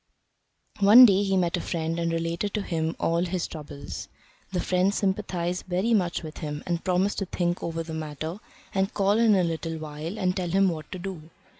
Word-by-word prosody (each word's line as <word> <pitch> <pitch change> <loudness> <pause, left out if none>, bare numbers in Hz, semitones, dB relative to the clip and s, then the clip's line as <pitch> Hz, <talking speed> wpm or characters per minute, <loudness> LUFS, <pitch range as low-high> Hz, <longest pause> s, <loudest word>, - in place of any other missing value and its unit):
One 210 +6 +10
day 200 -3 +4
he 195 -1 +1
met 175 -2 +1
a - - -3
friend 165 0 -2
and 170 0 0
related 165 +5 -2
to 210 - -1
him 160 -3 -2
all 170 +1 +1
his 180 -1 -2
troubles. 145 -2 -8 0.4
The 180 - -1
friend 185 +2 +2
sympathised 190 -3 -1
very 185 +6 +1
much 180 -6 +1
with 155 -1 -8
him, 150 -2 -5
and 170 -1 -2
promised 185 +2 +1
to 195 - -3
think 175 0 -1
over 165 0 -3
the 160 0 -7
matter, 160 +3 -5 0.3
and 195 +1 +1
call 200 +2 +2
in 225 -3 +5
a 185 - +3
little 165 -1 -2
while 155 +5 -6
and 185 -2 0
tell 180 -3 -2
him 195 +2 +3
what 155 -3 -6
to - - -4
do. 175 -4 -7
175 Hz, 200 wpm, -26 LUFS, 165-195 Hz, 0.4 s, One